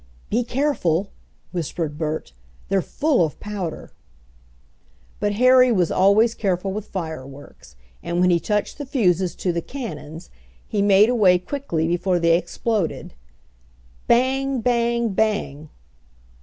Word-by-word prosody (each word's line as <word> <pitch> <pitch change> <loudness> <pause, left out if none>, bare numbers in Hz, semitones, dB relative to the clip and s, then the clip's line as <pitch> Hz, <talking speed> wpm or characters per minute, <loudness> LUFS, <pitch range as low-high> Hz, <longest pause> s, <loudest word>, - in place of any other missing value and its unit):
"Be 240 +3 +1
careful!" 235 - 0 0.4
whispered 165 -3 -3
Bert; 155 - -3 0.4
"they're 195 0 +2
full 285 - +1
of 155 -3 -3
powder." 200 -6 -6 1.3
But 205 0 0
Harry 255 +3 +5
was 180 -7 +1
always 215 +4 +4
careful 190 -2 -2
with 215 +1 -5
fireworks, 145 - -8 0.3
and 170 0 -2
when 180 0 +4
he 170 - +3
touched 210 - -2
the 290 - -4
fuses 185 - +1
to 180 - -2
the 170 - -1
"cannons" 165 - -8 0.4
he 205 - -1
made 200 +2 +5
away 205 -7 +4
quickly 180 - -3
before 175 +2 +1
they 170 -1 +3
exploded. 200 +1 -2 0.9
Bang! 265 +1 +2
Bang! 235 -1 +1
Bang! 195 -8 -1
195 Hz, 125 wpm, -22 LUFS, 170-235 Hz, 1.3 s, Harry